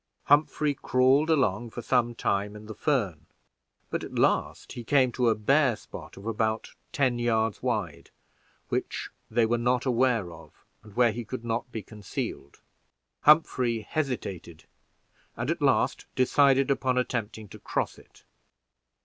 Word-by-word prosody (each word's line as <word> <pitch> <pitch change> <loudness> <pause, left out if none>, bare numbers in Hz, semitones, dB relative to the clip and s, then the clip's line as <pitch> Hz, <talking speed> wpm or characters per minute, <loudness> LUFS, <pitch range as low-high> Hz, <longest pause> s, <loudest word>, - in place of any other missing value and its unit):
Humphrey 150 0 +3
crawled 135 +4 +3
along 120 -7 +1
for 120 +1 -7
some 120 -2 +1
time 100 -1 -1
in 105 0 -10
the 110 - -7
fern, 100 - -1 0.6
but - - -2
at - - -8
last - - +1
he 120 - -7
came 130 +1 +3
to 120 -1 +2
a 110 - +2
bare 135 +3 +3
spot - - -11
of 95 - -11
about 110 0 -1 0.2
ten 130 -4 +1
yards 115 -3 0
wide, - - -3 0.6
which - - -3 0.2
they 115 0 +3
were 120 +1 +1
not 125 +1 +1
aware 120 -8 +1
of, 80 0 -16 0.2
and 105 -1 -16
where 120 -1 +4
he 120 +2 -5
could 120 +1 -7
not 120 +2 -2
be 110 -3 -5
concealed. 100 -9 -6 0.6
Humphrey 130 -7 +4
hesitated, 105 - -4 0.7
and 120 +6 -1
at 170 -1 -3
last 135 -2 +1
decided 135 +1 +4
upon 130 -2 0
attempting 110 -4 -2
to - - -11
cross - - -3
it. - - -21
120 Hz, 150 wpm, -27 LUFS, 110-130 Hz, 0.7 s, where